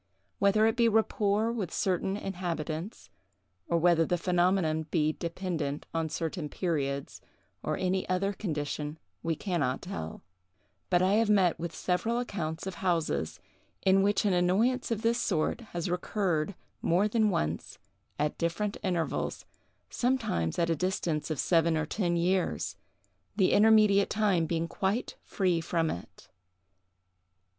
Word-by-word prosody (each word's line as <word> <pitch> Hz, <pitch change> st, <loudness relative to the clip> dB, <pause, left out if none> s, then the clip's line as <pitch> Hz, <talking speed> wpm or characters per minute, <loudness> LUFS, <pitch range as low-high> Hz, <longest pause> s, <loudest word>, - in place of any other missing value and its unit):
Whether 200 Hz, +2 st, +4 dB
it 225 Hz, -, +2 dB
be 235 Hz, -1 st, +4 dB
rapport 215 Hz, 0 st, +2 dB
with 215 Hz, -8 st, -3 dB
certain 190 Hz, +1 st, 0 dB
inhabitants, 175 Hz, -2 st, -4 dB, 0.6 s
or 170 Hz, -, +2 dB
whether 170 Hz, 0 st, +4 dB
the 175 Hz, +2 st, 0 dB
phenomenon 175 Hz, -3 st, +1 dB
be 155 Hz, -1 st, +2 dB
dependent 170 Hz, -4 st, -3 dB
on 165 Hz, -1 st, -1 dB
certain 160 Hz, -1 st, -3 dB
periods, 140 Hz, -6 st, -2 dB, 0.4 s
or 155 Hz, -, -2 dB
any 185 Hz, 0 st, -1 dB
other 195 Hz, +2 st, +1 dB
condition, 150 Hz, -5 st, -3 dB, 0.2 s
we 165 Hz, -1 st, -1 dB
can 180 Hz, +1 st, -2 dB
not 130 Hz, -2 st, 0 dB
tell; 80 Hz, -, -6 dB, 0.7 s
but 180 Hz, 0 st, +3 dB
I 190 Hz, +2 st, +3 dB
have 225 Hz, -, +1 dB
met 190 Hz, -6 st, +3 dB
with 165 Hz, -1 st, -4 dB
several 225 Hz, +6 st, 0 dB
accounts 170 Hz, -10 st, -3 dB
of 190 Hz, -, -4 dB
houses 165 Hz, -, 0 dB, 0.4 s
in 190 Hz, 0 st, +5 dB
which 205 Hz, +2 st, +2 dB
an 200 Hz, -, +3 dB
annoyance 195 Hz, +9 st, +2 dB
of 225 Hz, -1 st, -2 dB
this 235 Hz, +1 st, +2 dB
sort 165 Hz, +4 st, 0 dB
has 170 Hz, 0 st, -3 dB
recurred 180 Hz, -1 st, -1 dB, 0.3 s
more 180 Hz, +5 st, +3 dB
than 215 Hz, 0 st, +2 dB
once, 80 Hz, -, -2 dB, 0.4 s
at 150 Hz, 0 st, -1 dB
different 200 Hz, +5 st, -1 dB
intervals, 175 Hz, -5 st, -2 dB, 0.5 s
sometimes 230 Hz, -, 0 dB
at 170 Hz, -1 st, +1 dB
a -, -, +2 dB
distance 165 Hz, -2 st, -1 dB
of 155 Hz, -, -2 dB
seven 165 Hz, -2 st, +3 dB
or 155 Hz, -, 0 dB
ten 175 Hz, 0 st, 0 dB
years, 180 Hz, +2 st, 0 dB, 0.6 s
the 190 Hz, -3 st, +3 dB
intermediate 210 Hz, -2 st, +5 dB
time 200 Hz, -6 st, +2 dB
being 165 Hz, 0 st, -1 dB
quite 195 Hz, +7 st, -2 dB
free 180 Hz, -4 st, 0 dB
from 165 Hz, -1 st, 0 dB
it. 85 Hz, -, -9 dB
180 Hz, 140 wpm, -29 LUFS, 160-200 Hz, 0.7 s, in